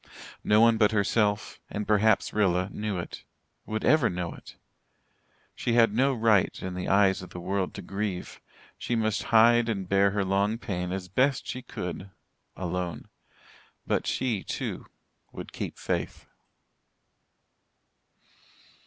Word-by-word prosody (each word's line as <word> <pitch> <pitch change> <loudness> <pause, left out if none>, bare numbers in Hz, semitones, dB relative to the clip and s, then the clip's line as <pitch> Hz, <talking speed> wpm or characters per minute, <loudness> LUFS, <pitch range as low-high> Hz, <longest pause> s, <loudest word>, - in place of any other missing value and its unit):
No 105 +1 +4
one 115 -1 +5
but 105 -1 +4
herself 105 0 0
and 105 0 -4
perhaps 110 +1 +3
Rilla 95 -2 +1
knew 105 -2 -3
it 85 - -7 0.4
would 110 0 -3
ever 145 -4 +4
know 90 -1 -4
it. - - -13 1.0
She 120 - -2
had 115 -3 +4
no 135 +5 +3
right 110 -4 +2
in 95 0 -5
the 90 0 -4
eyes 95 -1 +3
of 90 - -11
her 90 - -6
world 95 +1 -2
to 100 - -7
grieve. 95 0 -4 0.4
She 120 - -2
must 110 -2 0
hide 115 +1 +5
and 95 -4 -2
bear 100 +1 +4
her 100 0 -1
long 100 +3 +1
pain 90 -5 -4
as 95 -1 -4
best 130 +8 +1
she 125 - -5
could 95 -5 -6 0.5
alone. 90 -4 -4 0.8
But - - -1
she, 120 -6 -1
too, - - -5 0.5
would - - -8
keep - - -5
faith. - - -3
100 Hz, 140 wpm, -27 LUFS, 95-110 Hz, 1.0 s, one